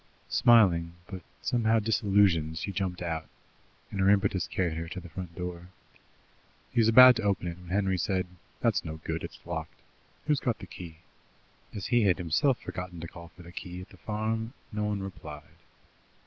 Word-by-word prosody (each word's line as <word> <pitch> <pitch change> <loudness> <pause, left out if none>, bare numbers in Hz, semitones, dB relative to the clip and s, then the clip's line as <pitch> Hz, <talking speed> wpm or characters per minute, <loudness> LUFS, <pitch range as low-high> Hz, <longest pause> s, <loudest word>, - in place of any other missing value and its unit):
Smiling, 85 -8 +5
but 95 -1 -8 0.2
somehow 115 -2 +2
disillusioned, 100 -7 +2
she 100 - -3
jumped 90 -2 -3
out, 80 -2 -3 0.6
and 100 - -4
her 95 +1 +4
impetus 100 -3 +2
carried 85 -4 -1
her 85 +1 -4
to 95 - -6
the 90 -1 -11
front 85 0 -7
door. 90 -1 -6 1.1
She - - +2
was 110 - +5
about 125 +2 +9
to - - -2
open 100 -4 0
it, 85 - -7
when 90 - -13
Henry 95 -1 +1
said: 95 0 0 0.4
"That's - - +2
no 80 0 -6
good; - - -3
it's - - -9
locked. - - -5 0.5
Who's 150 -2 +2
got 120 -3 -1
the 95 - -9
key?" 85 -3 -10 0.8
As 100 - -4
he 120 -1 +3
had 95 -3 +4
himself 95 - +2
forgotten 90 -1 -6
to 85 - -6
call 85 0 -11
for 90 +1 -15
the 85 - -12
key 90 0 -7
at 90 - -11
the 95 - -16
farm, 110 +4 -2 0.2
no 105 -1 -1
one 105 -2 -2
replied. 75 -6 -8
95 Hz, 185 wpm, -29 LUFS, 85-105 Hz, 1.1 s, about